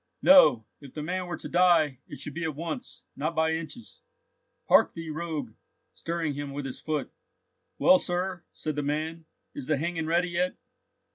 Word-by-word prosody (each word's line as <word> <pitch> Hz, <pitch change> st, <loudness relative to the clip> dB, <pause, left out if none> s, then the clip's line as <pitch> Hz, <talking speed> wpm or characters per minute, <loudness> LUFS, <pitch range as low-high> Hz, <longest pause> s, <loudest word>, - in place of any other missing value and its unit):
"No, 270 Hz, -, +7 dB
if 140 Hz, -3 st, -13 dB
the 150 Hz, -, -4 dB
man 180 Hz, +3 st, -2 dB
were 175 Hz, -, -4 dB
to -, -, -7 dB
die, 165 Hz, -7 st, +4 dB
it -, -, -9 dB
should 145 Hz, -, -5 dB
be 170 Hz, -, -4 dB
at 160 Hz, -3 st, -2 dB
once, 235 Hz, -, -6 dB
not 155 Hz, +4 st, -2 dB
by 160 Hz, 0 st, +2 dB
inches. 165 Hz, -, -6 dB, 0.7 s
Hark -, -, +5 dB
thee, 165 Hz, -1 st, -6 dB
rogue!" 155 Hz, -7 st, -4 dB, 0.4 s
stirring 165 Hz, -3 st, -2 dB
him 140 Hz, 0 st, -5 dB
with 145 Hz, 0 st, -4 dB
his 130 Hz, -, -6 dB
foot. 155 Hz, -2 st, -2 dB, 0.7 s
"Well, 275 Hz, +1 st, +6 dB
sir," 180 Hz, -3 st, -2 dB
said 155 Hz, -2 st, -4 dB
the 145 Hz, -, -1 dB
man, 155 Hz, +3 st, -3 dB, 0.3 s
"is 285 Hz, -3 st, -7 dB
the 155 Hz, -, +2 dB
hanging 165 Hz, +1 st, -2 dB
ready 175 Hz, +2 st, +2 dB
yet? 180 Hz, +1 st, 0 dB
165 Hz, 180 wpm, -28 LUFS, 150-175 Hz, 0.7 s, No